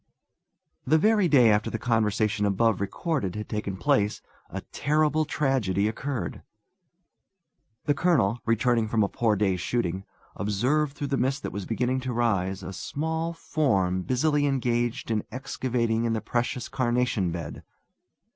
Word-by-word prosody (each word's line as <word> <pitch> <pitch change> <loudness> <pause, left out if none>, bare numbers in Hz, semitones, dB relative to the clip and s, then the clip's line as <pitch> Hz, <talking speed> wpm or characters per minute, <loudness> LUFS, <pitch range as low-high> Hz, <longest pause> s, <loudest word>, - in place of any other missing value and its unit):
The 155 +5 +3
very 210 +2 +3
day 125 -8 +6
after 105 0 +1
the - - -3
conversation 110 -2 +1
above 105 +1 +2
recorded 100 - -2
had 105 0 -5
taken 105 -3 -3
place 100 +3 +1 0.3
a - - -5
terrible 155 +1 +1
tragedy 130 -10 +1
occurred. 130 +3 -4 1.4
The 145 - +3
colonel, 140 - +2
returning 115 0 +2
from 110 -1 +2
a - - +2
poor 110 +1 +1
day's 95 -3 0
shooting, 95 -4 -1 0.3
observed 130 +9 0
through 145 - -3
the - - +2
mist 135 +3 0
that - - -4
was 100 -2 -5
beginning 125 +3 0
to 130 -1 -4
rise 100 -5 0
a 95 - -6
small 160 - -3
form 95 - 0
busily 145 - +1
engaged 120 -4 -1
in 110 -2 0
excavating 120 -3 -1
in 115 - +1
the 110 - 0
precious 120 +3 -2
carnation 120 -7 0
bed. 85 0 -6
120 Hz, 145 wpm, -26 LUFS, 105-135 Hz, 1.4 s, day